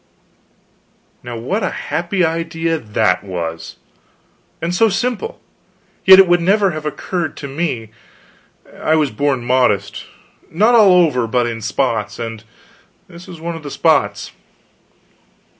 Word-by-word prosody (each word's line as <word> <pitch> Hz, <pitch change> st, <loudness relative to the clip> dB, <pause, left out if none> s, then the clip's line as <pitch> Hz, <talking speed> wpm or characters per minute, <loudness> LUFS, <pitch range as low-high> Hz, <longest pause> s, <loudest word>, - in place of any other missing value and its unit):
Now 120 Hz, -1 st, -7 dB
what 185 Hz, -, -2 dB
a 190 Hz, -, 0 dB
happy 175 Hz, +2 st, -2 dB
idea 165 Hz, 0 st, -2 dB
that 95 Hz, -6 st, 0 dB
was! 85 Hz, -3 st, -6 dB, 0.8 s
and 170 Hz, +1 st, -3 dB
so 225 Hz, +5 st, +3 dB
simple; 250 Hz, -, -3 dB, 0.7 s
yet 190 Hz, 0 st, +10 dB
it 190 Hz, -1 st, +7 dB
would 175 Hz, 0 st, +3 dB
never 195 Hz, +2 st, +2 dB
have 155 Hz, -1 st, -5 dB
occurred 170 Hz, +1 st, -4 dB
to 140 Hz, -, -6 dB
me. 135 Hz, -7 st, -3 dB, 0.9 s
I 155 Hz, -, +2 dB
was 150 Hz, -3 st, +1 dB
born 130 Hz, +1 st, -1 dB
modest; 120 Hz, -6 st, 0 dB, 0.4 s
not 215 Hz, +9 st, +2 dB
all 210 Hz, -5 st, +6 dB
over, 125 Hz, -7 st, -1 dB
but 120 Hz, +1 st, +1 dB
in 115 Hz, -1 st, -4 dB
spots; 110 Hz, -2 st, -2 dB
and 115 Hz, -2 st, -6 dB, 0.6 s
this 175 Hz, 0 st, -13 dB
was 170 Hz, -, -10 dB
one 170 Hz, +1 st, -5 dB
of 165 Hz, -, -8 dB
the 145 Hz, -, -7 dB
spots. -, -, 0 dB
155 Hz, 135 wpm, -17 LUFS, 120-175 Hz, 0.9 s, yet